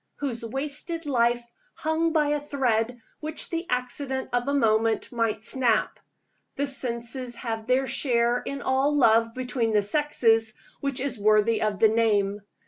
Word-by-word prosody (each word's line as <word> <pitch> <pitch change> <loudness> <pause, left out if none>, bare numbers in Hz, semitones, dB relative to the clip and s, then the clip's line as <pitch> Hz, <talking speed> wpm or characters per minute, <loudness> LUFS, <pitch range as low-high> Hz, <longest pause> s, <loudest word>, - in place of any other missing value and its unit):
whose 250 -5 -4
wasted 300 +7 -4
life 240 -3 +1 0.3
hung 320 +1 0
by 305 -2 +2
a 295 0 +1
thread 245 -5 -1 0.2
which 310 0 0
the 335 +1 -3
accident 260 +2 -2
of 245 +1 0
a - - +1
moment 225 -3 +1
might 230 -3 -1
snap? 245 +1 +1 0.6
The 285 - 0
senses 245 -2 -2
have 225 -2 -5
their 255 +1 +2
share 240 -2 +1
in 280 0 -6
all 270 +3 +1
love 230 -3 +4
between 250 -3 -1
the 210 -1 +3
sexes 225 -3 +2 0.2
which 275 -1 -1
is 265 -3 -3
worthy 215 +2 +3
of 215 -2 0
the 220 - +5
name. 210 -2 +1
245 Hz, 150 wpm, -26 LUFS, 225-280 Hz, 0.6 s, the